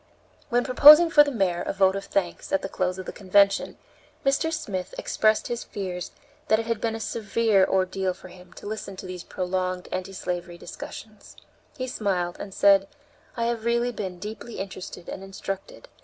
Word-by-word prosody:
When 245 +1 +2
proposing 305 +6 +8
for 295 -2 +8
the 290 - -2
Mayor 190 -9 0
a - - -3
vote 195 -1 +3
of 195 - -4
thanks, 180 -3 -2
at 195 - +1
the 195 - -3
close 185 0 -1
of 185 - -6
the - - -5
convention, 200 0 +2 0.5
Mr. 280 +4 +2
Smith 205 - -4
expressed 215 0 +1
his 240 -1 -3
fears 185 -3 -5 0.4
that 220 - +4
it 225 - -3
had 230 -2 -2
been 225 -1 -1
a - - -5
severe 220 -2 +1
ordeal 190 0 0
for 185 - -13
him 180 0 -15
to - - -12
listen 205 -2 -5
to 185 - -9
these 185 -1 -7
prolonged 185 0 -3
anti 185 +1 -4
slavery 175 -2 -4
discussions. 215 +4 -10 0.4
He 255 - -2
smiled, 190 -8 -2
and 200 - -7
said: 195 0 +4 0.5
"I 230 - 0
have 235 -1 -1
really 235 +1 +1
been 190 -6 -5
deeply 215 +4 -8
interested 185 -2 -7
and 190 - -6
instructed. 195 0 -7
195 Hz, 185 wpm, -25 LUFS, 185-225 Hz, 0.5 s, proposing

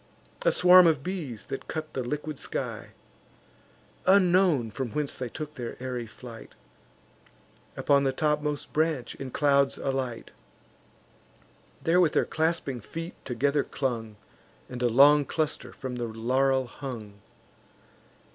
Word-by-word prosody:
A - - +4
swarm 180 0 +7
of 150 -4 +2
bees, 160 - -5
that 135 - -6
cut 155 -1 -5
the 130 - -2
liquid 150 +3 -4
sky, - - -5 1.1
Unknown 180 - +4
from 130 +3 -4
whence 150 -2 -2
they 125 -2 -5
took 150 +4 -7
their 120 -5 -6
airy 125 -2 -4
flight, 115 0 -12 1.2
Upon 140 -1 +3
the 135 - +2
topmost 150 +1 -1
branch 155 -5 0
in 135 - -7
clouds 140 0 +2
alight; 130 -4 -3 1.5
There 175 +2 +4
with 165 -4 +3
their - - +3
clasping 160 -6 -1
feet 165 - -7
together 140 +3 +1
clung, 115 -5 -3 0.5
And 125 -1 -7
a 120 - +3
long 145 +5 +6
cluster 155 +2 -3
from 130 -2 -6
the 120 - -2
laurel 130 +4 +1
hung. 115 -6 -8
135 Hz, 130 wpm, -27 LUFS, 125-155 Hz, 1.5 s, swarm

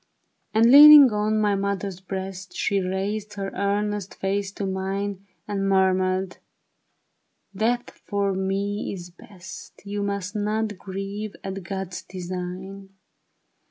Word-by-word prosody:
And 225 +2 +4
leaning 290 -2 +10
on 210 +1 0
my 210 -1 +2
mother 200 0 -2 0.2
breast, 190 0 -6
She 200 - 0
raised 195 +3 -3
her 195 -1 -4
earnest 205 0 -2
face 195 0 -2
to 200 - -4
mine 195 +1 -3 0.2
And 195 -1 -1
murmured, 190 0 +2
'^ - - -16 1.2
Death 240 +2 0 0.2
for 200 -1 0
me 195 +2 -2
is 175 -2 -9
best. 175 -1 -12
You 205 0 -3
must 200 0 -3
not 210 -1 -1
grieve 195 +2 -6
at 195 0 -5
God's 190 0 -5
design." 185 +2 -7
195 Hz, 125 wpm, -24 LUFS, 190-205 Hz, 1.2 s, leaning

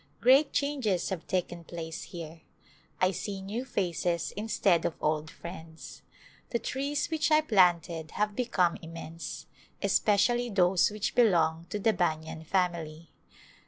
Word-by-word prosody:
Great 270 +5 +5
changes 260 -11 0
have 185 -4 -5
taken 175 -2 -2
place 165 -1 -6
here. 165 -1 -9 0.6
I 185 0 +3
see 195 +1 -4
new 205 +6 -4
faces 175 -6 -1
instead 200 -5 +2
of - - -1
old 155 0 0
friends. 165 -2 -10 0.5
The 235 - 0
trees 280 +6 -2
which 315 -1 +1
I 305 0 +5
planted 175 - +2
have 210 0 0
become 190 -8 +1
immense, 165 0 -7 0.4
especially 240 +4 +3
those 185 -3 +3
which 210 -1 -3
belong 170 -7 +3
to - - -2
the 220 +2 +2
banyan 160 -2 -2
family. 170 -4 -1
180 Hz, 130 wpm, -29 LUFS, 165-220 Hz, 0.6 s, Great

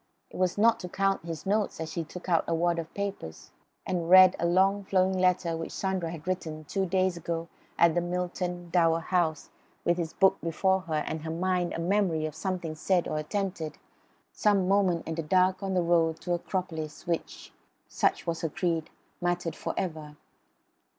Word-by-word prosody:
It - - -9
was 185 0 +1
not 225 +2 +4
to 180 - -6
count 195 -2 0
his 165 -3 -6
notes 205 +1 0
that 160 0 -5
he 170 - -2
took 180 +4 -10
out 170 -3 +3
a 165 - +1
wad 170 0 +1
of 165 -1 -6
papers 200 - -5 0.3
and 175 -2 -2
read 185 0 +9
a 170 - +1
long 195 +3 +3
flowing 190 -1 +2
letter 180 -2 +2
which 165 0 -5
Sandra 190 -3 -2
had 165 0 -8
written 160 -4 -3
two 190 +5 -2
days 185 0 +1
ago 170 0 -4 0.3
at 170 -1 +5
Milton 175 0 -3
Dower 165 -2 +3
House 165 -3 0 0.3
with 175 0 +2
his 165 -2 -3
book 190 -1 +3
before 190 +3 +1
her 155 -1 0
and 160 - -3
in - - -12
her - - -3
mind 180 +1 0
the - - -4
memory 175 -3 +1
of 155 - -4
something 170 0 -3
said 175 +3 +1
or 155 - -2
attempted, 175 -1 -3 0.5
some 200 -3 +2
moment 190 -4 +2
in 160 - -2
the 165 - -2
dark 185 +3 +2
on 195 -1 -2
the 180 - +2
road 165 -1 +2
to 180 - -4
the 175 - +3
Acropolis 165 -4 -4
which 170 -1 -4 0.3
(such - - 0
was 165 -1 -2
her 165 - -1
creed) 165 -1 -1 0.3
mattered 175 -1 -1
for - - -4
ever. 155 -5 -4
175 Hz, 190 wpm, -28 LUFS, 165-185 Hz, 0.5 s, read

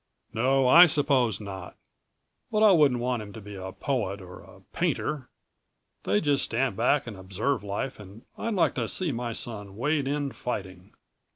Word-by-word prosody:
"No, 130 +3 +2
I 170 +7 +9
suppose 135 - +2
not. 95 -3 -8 0.7
But 215 -1 +2
I 215 - +8
wouldn't 145 -8 +4
want 125 -2 -1
him 100 -1 -9
to - - -8
be 105 -1 -10
a 95 -1 -6
poet 105 -5 -2
or 90 -1 -11
a - - -16
painter. 140 -5 -1 0.8
They 100 +2 +2
just 145 -2 +1
stand 125 +2 0
back 135 +5 +2
and 115 -4 -7
observe 100 +6 -2
life 105 +6 -4
and 105 +2 -12
I'd 230 -2 -3
like 165 -7 +3
to 120 -3 -2
see 180 - -2
my 120 -1 -3
son 105 -4 -7
wade 145 +2 0
in 145 0 -1
fighting." 95 -7 -6
120 Hz, 175 wpm, -27 LUFS, 100-140 Hz, 0.8 s, I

